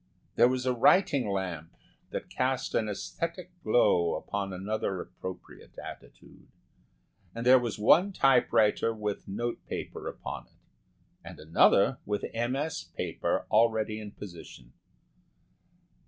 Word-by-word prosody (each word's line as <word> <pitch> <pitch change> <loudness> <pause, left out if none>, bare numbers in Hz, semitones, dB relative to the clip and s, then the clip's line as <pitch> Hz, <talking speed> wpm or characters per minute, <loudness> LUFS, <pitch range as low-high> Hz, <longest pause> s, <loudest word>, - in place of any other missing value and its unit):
There 120 - +6
was 130 0 -1
a 130 - +2
writing 135 - +4
lamp 90 -5 -4 0.3
that - - -5
cast 130 +1 -1
an 110 - +1
æsthetic 170 - -4
glow 90 -6 +3
upon 100 -1 -4
another 95 0 -3
appropriate 95 +1 -9
attitude - - -12 0.9
and 115 +1 -4
there 130 +1 +8
was 120 -3 -3
one 165 - +5
typewriter 115 - +3
with 105 -2 -4
note 120 +5 -3
paper - - -6
upon - - -6
it, - - -32 0.7
and - - -10
another 80 +2 +4
with 105 0 -2
MS. 135 +5 -2
paper - - -1
already 110 -1 +2
in 105 -1 -7
position. 85 -11 -11
110 Hz, 120 wpm, -29 LUFS, 100-125 Hz, 0.9 s, there